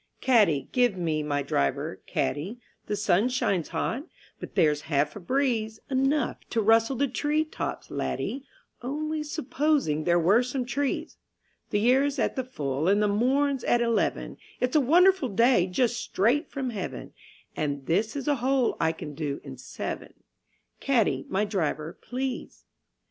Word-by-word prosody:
Caddie, 205 - +3
give 245 -6 +2
me 160 -3 -1
my 145 -1 -1
driver, 70 - -1
caddie, 180 - -2 0.3
The 210 - -1
sun 205 +2 +2
shines 195 -9 0
hot, 275 +8 -3 0.3
but - - -9
there's 150 -2 +3
half 145 0 +1
a - - -6
breeze, 225 0 0
Enough 270 +1 +1
to 230 - 0
rustle 225 +4 +4
the 280 +3 +1
tree 295 +4 0
tops, 310 - -5
laddie, 270 +2 -3 0.4
Only 305 +5 -3
supposing 290 - 0
there 175 0 +4
were 190 +8 +4
some 250 0 -2
trees; 275 +2 -2 0.5
The 205 - +1
year's 270 +5 +3
at 240 - 0
the 260 - -1
full 145 - -3
and 200 +2 +4
the 210 - +3
morn's 265 +6 +1
at 240 - +3
eleven, 235 -1 0 0.2
It's 250 +2 0
a 305 - +6
wonderful 350 +1 +4
day 230 -2 +4
just 240 +6 +1
straight 240 - +1
from 265 -3 -3
Heaven, 200 -5 -6 0.4
And 145 -2 -2
this 210 - 0
is 280 -1 -4
a 290 -1 +2
hole 260 0 +1
I 160 - +2
can 155 -2 -8
do 145 -1 -3
in 135 -2 -8
seven 130 - -6 0.6
Caddie, 220 - +1
my 195 +2 +1
driver, 165 -5 -2
please. 260 +1 -5
230 Hz, 155 wpm, -27 LUFS, 175-270 Hz, 0.6 s, a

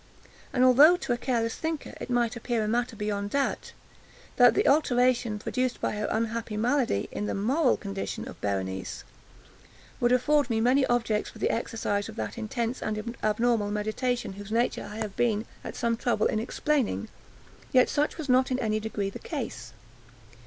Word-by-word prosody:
And 255 - +2
although, 290 +8 +7
to 255 - -1
a - - +1
careless 230 -3 0
thinker, 320 -2 -4
it - - -6
might 240 -2 +1
appear 235 -1 -1
a - - -1
matter 235 +1 0
beyond 205 -1 -2
doubt, 280 +4 -1 0.7
that 245 -1 +7
the - - +2
alteration 250 -6 +3
produced 255 +4 -2
by - - -1
her 210 0 -2
unhappy 225 -1 -2
malady, 240 - +1
in 210 - -3
the - - -2
moral 255 +7 +2
condition 195 -2 -5
of - - -11
Berenice, 95 -2 -3 1.0
would 240 0 +2
afford 285 +3 +3
me 225 -1 +1
many 255 +4 +3
objects 230 -3 0
for - - -13
the - - +1
exercise 220 -3 -2
of 220 - -9
that - - -4
intense 235 +1 -3
and 215 +2 -3
abnormal 215 0 +1
meditation 215 +1 -2
whose 205 +1 -9
nature 235 +2 0
I 210 - -8
have 215 -3 -4
been 225 -2 +1 0.2
at - - -7
some 235 -1 0
trouble 235 +1 0
in 215 - +1
explaining, 250 0 -1 0.6
yet 255 -1 +5
such 295 0 0
was 315 -3 -5
not 255 0 +4
in 255 - 0
any 215 -4 0
degree 210 -2 -3
the - - -8
case. 225 - -5
230 Hz, 175 wpm, -27 LUFS, 210-255 Hz, 1.0 s, although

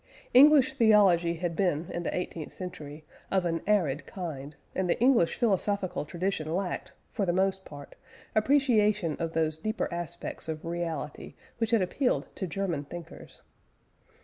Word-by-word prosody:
English 275 0 +7
theology 200 -8 +4
had 170 0 -3
been, 170 -4 0
in 175 - -3
the 170 - -3
eighteenth 170 -3 -5
century, 155 -5 -8 0.2
of 190 -2 +1
an 165 -1 -1
arid 170 -9 +1
kind, 150 -6 -6 0.2
and 185 -1 -1
the - - +1
English 240 -8 +4
philosophical 200 -6 0
tradition 170 -1 -2
lacked, 190 -1 -3 0.2
for 210 - -1
the 180 - +2
most 190 +1 0
part, 145 -1 -11 0.4
appreciation 215 - +3
of 165 -1 -3
those 160 -1 0
deeper 215 +5 -2
aspects 170 -1 -5
of 155 0 -5
reality 165 -3 -4 0.2
which 225 -1 0
had 225 -4 +3
appealed 250 +8 0
to 190 - -3
German 175 -5 -2
thinkers. 170 +3 -11
180 Hz, 145 wpm, -28 LUFS, 165-210 Hz, 0.4 s, English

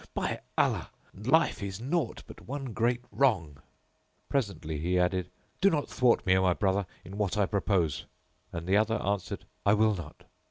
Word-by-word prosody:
By - - -1 0.2
Allah, - - +2 0.2
life 130 - +2
is 100 0 -4
naught 155 +8 -1
but - - -13
one 135 -3 -4
great 120 +2 +1
wrong." 95 - +1 0.7
Presently 100 - -1
he 90 +4 +1
added, 90 0 +1 0.3
"Do 195 - +6
not 150 -6 -1
thwart 125 -2 +3
me, 95 -1 +5
O 95 - +4
my 90 -1 +4
brother, 95 0 +1 0.2
in 100 +4 -8
what 105 0 0
I 105 - +4
propose;" 90 -8 0 0.4
and 85 0 -5
the 95 +3 +3
other 110 +1 +2
answered, 100 -1 -2 0.2
"I 100 - +5
will 110 0 +4
not." 85 -6 -8
100 Hz, 170 wpm, -29 LUFS, 90-120 Hz, 0.7 s, Do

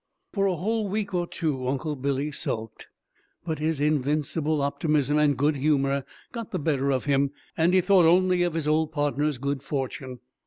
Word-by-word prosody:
For 195 -2 +2
a 185 - +1
whole 210 +4 -1
week 205 0 -2
or 175 -1 0
two 145 -8 -2
Uncle 145 +3 -2
Billy 140 +2 -1
sulked, 110 -5 -4 0.6
but 160 -3 -3
his 155 -1 0
invincible 150 +1 0
optimism 150 0 +1
and 145 -3 +3
good 145 +2 +2
humor 140 -1 +1 0.3
got 230 -3 -6
the - - -2
better 140 -3 0
of 130 -2 -1
him, 140 -1 +2 0.3
and 165 +1 +3
he 185 0 +4
thought 185 -2 +5
only 180 +1 +4
of 175 -2 0
his 160 -2 -1
old 155 0 +2
partner's 145 -1 0
good 140 +1 -2
fortune. 135 -2 -4
150 Hz, 180 wpm, -26 LUFS, 140-165 Hz, 0.6 s, thought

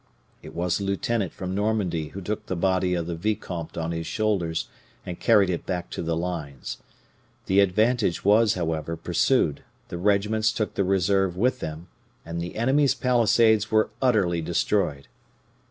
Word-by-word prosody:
It - - -11
was 90 +2 0
a - - -4
lieutenant 100 0 -1
from 95 0 -5
Normandy 100 -6 -1
who 100 +5 -8
took 105 +4 -4
the 95 - -2
body 90 0 +1
of 85 -2 -2
the 85 - -4
vicomte 85 -3 -4
on 80 0 -2
his 80 -1 -4
shoulders 95 -7 -1 0.4
and 90 -1 -6
carried 105 -5 +4
it 85 - -3
back 90 -2 -3
to - - -4
the 80 -1 -1
lines. 80 -7 -5 0.7
The 95 +1 +3
advantage 105 0 +2
was, 105 +1 +4
however, 80 -1 -2
pursued, 85 - +1 0.3
the 85 - -5
regiments 105 +3 +2
took 110 -2 -2
the 100 - 0
reserve 95 -1 +1
with 125 +5 +1
them, 80 0 -6 0.4
and 85 +1 -4
the 85 - -6
enemy's 135 +5 +2
palisades 115 -3 +3
were 110 0 +2
utterly 100 -10 +2
destroyed. 85 -3 0
95 Hz, 160 wpm, -25 LUFS, 85-110 Hz, 0.7 s, carried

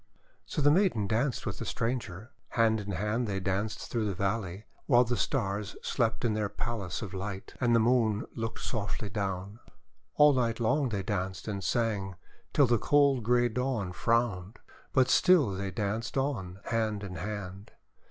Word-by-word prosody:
'' - - -38
So 150 - -2
the 145 - +6
maiden 175 - +3
danced 120 +6 0
wTith - - -4
the - - -4
stranger. 115 -2 -3 0.3
Hand 110 -1 +4
in 100 -1 -4
hand 105 +6 -1
they 100 -2 -1
danced 95 +3 -2
through 115 -3 0
the 100 - -2
valley 100 0 -2 0.2
while 125 -3 +6
the 120 0 -1
Stars 105 -6 -1
slept 115 -1 0
in 115 - +2
their 105 -1 -1
palace 105 -7 -4
of 100 -3 -6
light, 95 0 -5
and 120 -2 +4
the - - +5
Moon 115 -2 +2
looked 115 0 -4
softly 105 -2 -3
down. 100 +1 -3 0.6
All 150 0 +7
night 120 -3 0
long 125 +4 +2
they 100 -3 -2
danced 95 -3 -3
and 100 -2 -3
sang, 100 -2 0 0.4
till 145 - +5
the 120 -2 +2
cold 140 -2 +4
grey 120 +2 +3
Dawn 120 -5 -2
frowned. 115 -2 0 0.3
But 130 -2 +4
still 170 - +5
they 95 +1 -3
danced 105 +6 -2
on, 100 -9 -2
hand 110 -3 -1
in 90 -2 -6
hand. 100 +1 -6
110 Hz, 170 wpm, -30 LUFS, 100-120 Hz, 0.6 s, All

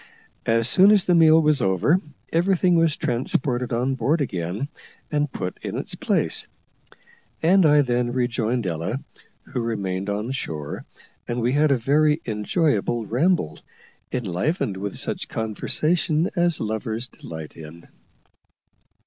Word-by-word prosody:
As 115 0 +3
soon 185 +10 +6
as 210 -3 +5
the 180 - +3
meal 160 -1 +6
was 150 -3 +2
over, 95 - +2 0.3
everything 180 +1 +3
was 165 -3 +3
transported 125 +1 -1
on 125 +3 0
board 135 +6 +1
again, 95 - -2 0.4
and 145 -2 0
put 90 -6 -5
in - - -4
its - - -5
place; - - -1 1.0
and 180 +1 +5
I 145 -1 +5
then 120 -1 0
rejoined 120 -2 -1
Ella, 85 +8 -2 0.4
who - - -5
remained 100 -4 -2
on 105 +4 -2
shore, 75 - -5 0.4
and 120 +1 -2
we 120 +2 +1
had 150 +2 +3
a 135 - +4
very 150 +5 +2
enjoyable 115 - 0
ramble, 130 - +1 0.5
enlivened 120 - -1
with 100 +1 -4
such - - -2
conversation 155 - 0
as 175 -2 +2
lovers 110 +2 -2
delight 80 -10 -10
in. 80 +1 -11
125 Hz, 130 wpm, -23 LUFS, 105-155 Hz, 1.0 s, soon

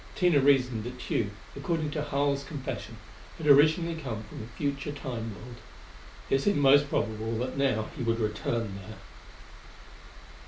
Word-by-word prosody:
Tina 175 -5 +4
reasoned 130 -5 +3
that 125 +1 -6
Tugh, 110 -4 -1 0.3
according 160 -4 -1
to 150 - -2
Harl's 140 -1 0
confession, 140 -1 -6 0.4
had 160 - -6
originally 155 +4 +5
come 125 -9 -5
from - - -9
a 110 - -8
future 140 0 -2
Time 120 -6 -5
world. 120 +3 -11 0.7
It 135 - +3
seemed 205 +6 +2
most 145 0 +5
probable 110 -1 -1
that 125 +2 -3
now 130 -6 +1
he - - -6
would 115 -1 0
return 105 -1 -2
there. 110 +3 -10
135 Hz, 150 wpm, -29 LUFS, 115-145 Hz, 0.7 s, originally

